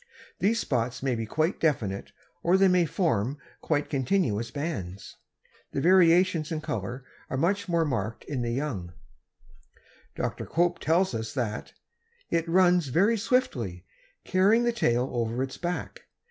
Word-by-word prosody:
These 215 +5 +2
spots 125 - -1
may 135 -2 +1
be 115 -2 -3
quite 155 - 0
definite 110 -11 -1 0.3
or 175 +3 +3
they 195 0 +5
may 180 -2 +3
form 145 - 0 0.2
quite 150 -2 0
continuous 130 - 0
bands. 100 - -5 0.6
The - - -1
variations 175 -1 +4
in 160 - -1
color 120 +2 -4 0.2
are 130 - -2
much 190 +6 0
more 170 -1 +2
marked 115 -6 -3
in 135 -4 -4
the 120 - -1
young. 115 - -3 1.2
Dr. - - -3
Cope 175 +1 +1
tells 175 +2 +2
us 110 +1 -4
that 115 -5 -3 0.6
"it 165 0 0
runs 180 -2 +4
very 195 - +3
swiftly, 125 - -1 0.4
carrying 200 +6 +3
the 240 - +2
tail 125 - +1
over 120 +1 -1
its 135 -1 -6
back. 175 0 -4
150 Hz, 145 wpm, -27 LUFS, 120-180 Hz, 1.2 s, they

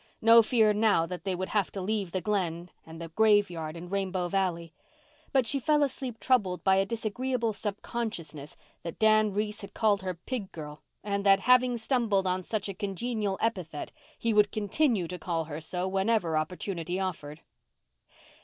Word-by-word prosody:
No 230 +1 +8
fear 220 -1 +3
now 210 -6 +3
that 180 +1 -7
they 190 -2 0
would 185 +1 -4
have 205 -4 0
to 195 - -4
leave 195 -1 -2
the 185 - -2
Glen 175 -4 -2 0.2
and 160 0 -10
the 165 -1 -7
graveyard 175 -5 +2
and 175 +2 -9
Rainbow 190 -2 -1
Valley. 170 -4 -1 0.6
But 265 -3 +3
she 275 +5 +1
fell 295 +3 +3
asleep 260 -4 -3
troubled 205 -9 +1
by 190 0 +4
a 195 0 +2
disagreeable 230 +1 -2
subconsciousness 200 -8 -5 0.2
that 170 - -7
Dan 215 -1 +4
Reese 210 +1 -2
had 200 - -10
called 210 -3 +2
her 185 -1 -3
pig 200 +3 -5
girl 150 -1 -9 0.2
and 200 -1 -2
that, 195 0 +6
having 250 +1 +4
stumbled 225 -5 +1
on 185 0 0
such 210 +2 -2
a 195 - -4
congenial 200 +1 -2
epithet, 180 -10 -2 0.3
he 230 -1 0
would 210 -1 +4
continue 215 - +1
to 180 +1 -6
call 165 -1 -2
her 155 0 -6
so 180 +3 -3
whenever 190 -3 +1
opportunity 175 +2 -2
offered. 160 -5 -4
195 Hz, 170 wpm, -29 LUFS, 175-220 Hz, 0.6 s, No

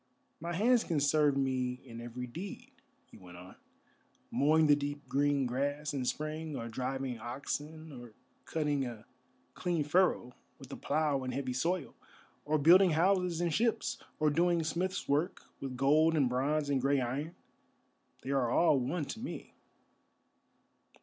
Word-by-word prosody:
"My 170 +2 -4
hands 235 +5 +3
can 165 -5 0
serve 145 0 +3
me 130 -2 0
in 115 -2 -9
every 120 +1 -6
need," 195 - -8 0.3
he - - -16
went 90 -2 -13
on. 90 +1 -12 0.8
"Mowing 155 +3 +4
the 145 -1 +6
deep 145 0 -5
green 140 -1 +1
grass 145 +4 -2
in 135 -3 -2
spring, 155 +4 -3
or 115 - -4
driving 130 +1 -3
oxen, 150 +6 -5
or 120 -4 -11 0.3
cutting 150 -3 0
a 115 -3 -7 0.5
clean 175 -4 -1
furrow 150 -5 +2 0.2
with - - -13
the - - -6
plough 150 -4 0
in 130 - -3
heavy 130 -2 -2
soil, 165 +4 -1 0.5
or 155 +1 +2
building 175 +4 +6
houses 180 -1 +2
and 170 -2 0
ships, 230 +3 0 0.2
or 155 -1 +3
doing 170 +2 +2
smith's 175 +4 -2
work 150 +6 0 0.2
with 130 -2 -5
gold 155 +5 +4
and 135 -4 +3
bronze 145 +4 0
and 140 -2 +1
grey 140 +1 +2
iron—they 135 +1 -8
are 135 -4 +1
all 150 +2 +4
one 145 +5 -2
to 220 - -7
me." 250 - -7
145 Hz, 150 wpm, -32 LUFS, 130-160 Hz, 0.8 s, the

